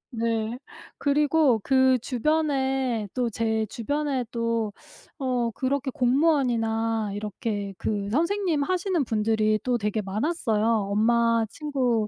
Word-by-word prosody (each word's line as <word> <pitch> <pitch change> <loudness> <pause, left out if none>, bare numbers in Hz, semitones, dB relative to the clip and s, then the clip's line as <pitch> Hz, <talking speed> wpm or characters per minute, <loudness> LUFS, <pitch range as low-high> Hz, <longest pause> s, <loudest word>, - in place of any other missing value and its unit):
네. 225 0 -1 0.4
그리고 290 -3 +3
그 260 -1 +4
주변에 265 -4 0
또 250 -2 0
제 220 0 0
주변에 280 +2 -2
또 230 -2 -1 0.5
어 250 -3 0
그렇게 265 +3 -1
공무원이나 235 -6 +1
이렇게 205 -1 -4
그 205 -2 -2
선생님 335 - +1
하시는 365 -1 0
분들이 215 -1 +1
또 245 -1 +1
되게 210 0 -1
많았어요. 220 - -1 0.2
엄마 230 +2 +3
친구 255 -8 -1
235 Hz, 235 characters per minute, -25 LUFS, 220-280 Hz, 0.5 s, 그